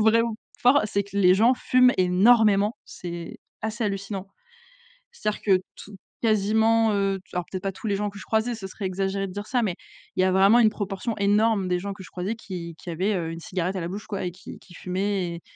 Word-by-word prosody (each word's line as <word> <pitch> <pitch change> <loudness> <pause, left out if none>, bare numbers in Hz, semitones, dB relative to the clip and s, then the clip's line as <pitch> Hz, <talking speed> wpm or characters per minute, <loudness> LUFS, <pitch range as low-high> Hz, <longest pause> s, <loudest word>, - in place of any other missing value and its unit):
vraiment 230 +1 +3 0.3
fort, 260 +4 +5
c'est 200 -1 0
que 200 0 -9
les 185 -2 +6
gens 230 +6 +5
fument 250 0 +4
énormément, 205 +3 +4
c'est 170 -1 -8 0.2
assez 220 +2 -3
hallucinant. 195 -1 -3 0.9
C'est-à-dire 215 - -3
que 190 -3 +3 0.2
tou 205 0 -11 0.3
quasiment, 220 +1 +3
heu, 195 -1 0
alors 180 -1 -2
peut-être 185 - -4
pas 195 - -1
tous 190 - -12
les 200 - +1
gens 205 +1 -1
que 200 - -12
je - - -10
croisais, 225 +2 0
ce 200 -3 -8
serait 195 +1 -7
exagéré 195 +1 -1
de - - -8
dire 205 +1 -5
ça, 250 -2 +1
mais 185 -5 -1 0.4
il - - +2
y - - +4
a 185 - +3
vraiment 195 +5 +5
une 220 -2 +6
proportion 205 +2 -4
énorme 205 -1 +2
des 180 0 +1
gens 200 +1 -4
que 195 - -11
je - - -12
croisais, 185 +5 -3
qui 175 -6 -7
qui - - -10
avaient, 185 +6 0
heu, 165 -2 -2
une 165 - -6
cigarette 185 0 -3
à 185 - -2
la 170 - -3
bouche 200 +3 -6
quoi, 200 -3 -4
et 180 - -2
qui 185 - -11
qui 180 - -18
fumaient 185 -1 -2
et 170 - -9
200 Hz, 230 wpm, -25 LUFS, 185-220 Hz, 0.9 s, les